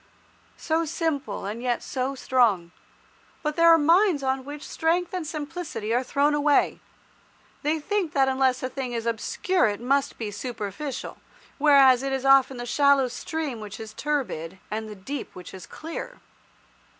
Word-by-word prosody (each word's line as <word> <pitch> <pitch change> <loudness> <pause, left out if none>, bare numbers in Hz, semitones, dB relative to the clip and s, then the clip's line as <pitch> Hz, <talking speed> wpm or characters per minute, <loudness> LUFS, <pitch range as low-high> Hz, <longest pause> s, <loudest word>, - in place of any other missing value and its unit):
So 320 +1 0
simple, 295 - -2
and 215 +4 -4
yet 245 -1 -1
so 265 0 -2
strong. 225 -10 +2 0.7
But 300 -1 -1
there 335 0 +5
are 330 - +8
minds 330 0 +3
on 265 0 0
which 290 +2 -8
strength 340 +2 0
and 355 -4 -3
simplicity 305 -7 -4
are 245 - +3
thrown 285 +3 +1
away. 295 0 +2 0.8
They 305 +2 +1
think 375 +1 -1
that 270 -1 +3
unless 260 -1 +1
a 255 - -1
thing 255 -2 -4
is 230 -1 -3
obscure 240 +8 +1
it 205 -1 -2
must 275 +3 0
be 215 -3 -4
superficial, 240 +4 -5 0.4
whereas 275 -4 +6
it 270 0 -2
is 265 0 -2
often 270 -1 +5
the 240 - -5
shallow 280 -1 +3
stream 290 0 -4
which 210 -1 -8
is 220 -1 -8
turbid, 235 - -3
and 215 0 -3
the 210 - -8
deep 270 +9 -6
which 180 - -10
is 190 -2 -10
clear. 330 +10 -7
270 Hz, 160 wpm, -25 LUFS, 235-300 Hz, 0.8 s, are